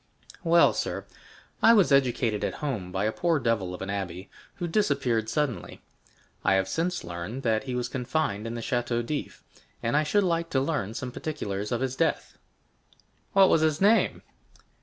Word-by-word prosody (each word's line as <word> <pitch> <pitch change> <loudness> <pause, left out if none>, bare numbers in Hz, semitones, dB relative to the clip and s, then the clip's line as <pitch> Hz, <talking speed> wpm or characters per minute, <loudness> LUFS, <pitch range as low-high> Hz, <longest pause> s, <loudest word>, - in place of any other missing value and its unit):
"Well, 170 0 +5
sir, - - -3 0.6
I 230 - +7
was 200 -9 +4
educated 125 -5 +2
at - - -3
Rome 110 -11 -3
by 95 +2 -1
a 110 - +1
poor 170 +6 +1
devil 115 -8 0
of 90 - -7
an 95 - -6
abbé, 95 -1 -4 0.3
who 175 - -3
disappeared 135 - +1
suddenly. 135 - -2 0.6
I 95 - +4
have 95 0 +1
since 170 - -1
learned 85 +10 -6
that 110 +1 +1
he 130 -2 -3
was 125 0 -1
confined 125 -4 -2
in 115 - -4
the 115 - -4
Château 120 0 -1
d'If, 150 +3 -5 0.4
and 115 +5 0
I 150 - +5
should 200 +7 +2
like 170 -2 0
to 135 - +1
learn 130 -7 -2
some 125 0 -4
particulars 105 -9 -4
of 120 0 -1
his 130 -1 -1
death." 160 +4 -1 0.9
"What 195 -1 +7
was 160 - +4
his 155 -1 +2
name?" 210 +4 +3
125 Hz, 180 wpm, -27 LUFS, 105-155 Hz, 0.9 s, I